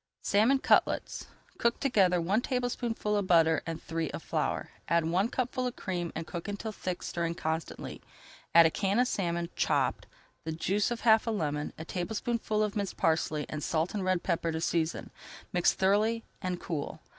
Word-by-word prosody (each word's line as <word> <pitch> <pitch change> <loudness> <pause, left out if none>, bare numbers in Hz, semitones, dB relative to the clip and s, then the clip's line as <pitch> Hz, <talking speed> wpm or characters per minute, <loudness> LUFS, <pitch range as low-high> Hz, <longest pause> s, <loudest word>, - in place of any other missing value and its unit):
SALMON 225 +7 +4
CUTLETS - - +1 0.3
Cook 235 0 +2
together 190 -9 +3
one 195 +7 +1
tablespoonful 245 -4 -1
of 200 -2 0
butter 165 -2 +4
and 165 -1 -3
three 165 -2 -2
of - - -6
flour. - - -2 0.2
Add 170 -1 +2
one 185 +7 +1
cupful 255 0 -1
of 250 - -5
cream 175 -3 -3
and 160 - -3
cook 170 +1 -6
until 205 +2 -4
thick, 185 -3 -4
stirring 170 -1 -2
constantly. 160 0 -4 0.5
Add 170 0 +9
a 160 - +4
can 200 +3 0
of 250 +1 +4
salmon, 170 -5 -1
chopped, - - +1 0.4
the 160 - -3
juice 195 +7 0
of 240 -1 -3
half 220 -1 +5
a - - +2
lemon, 150 -8 -1
a 160 - -7
tablespoonful 215 +4 -1
of 210 0 -2
minced 200 -2 -2
parsley, 160 -2 +1
and 150 - -5
salt 160 +1 0
and 205 -3 -2
red 185 -1 +1
pepper 170 -2 0
to 160 - -2
season. 165 0 -1 0.4
Mix 175 -1 +4
thoroughly, 215 +4 +2 0.2
and 180 -2 -2
cool. 155 -1 -4
185 Hz, 180 wpm, -30 LUFS, 165-220 Hz, 0.5 s, Add